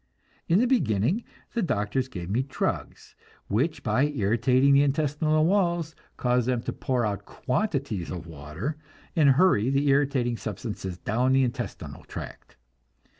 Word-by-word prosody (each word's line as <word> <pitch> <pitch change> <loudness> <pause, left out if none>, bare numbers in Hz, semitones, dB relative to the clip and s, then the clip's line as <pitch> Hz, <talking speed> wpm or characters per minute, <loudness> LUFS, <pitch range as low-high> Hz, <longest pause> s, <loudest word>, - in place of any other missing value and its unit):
In 170 - +4
the 235 - +4
beginning 165 - +1 0.3
the 235 - 0
doctors 125 - 0
gave 90 -9 -7
me 110 +7 +1
drugs 135 0 -4 0.4
which 135 +11 0
by 120 +4 +2
irritating 130 +1 +2
the 140 - +6
intestinal 150 +2 +2
walls 170 -4 +1 0.2
cause 125 -1 +1
them 125 -2 0
to - - -3
pour 125 -3 -1
out 100 -2 -3
quantities 135 - -2
of 85 -3 -6
water, 80 - -5 0.4
and 155 -4 +5
hurry 135 - +4
the 140 +1 +2
irritating 135 -4 +2
substances 100 -4 -5
down 125 +7 +1
the 135 0 +4
intestinal 120 -2 -4
tract. - - -9
130 Hz, 140 wpm, -26 LUFS, 110-150 Hz, 0.4 s, the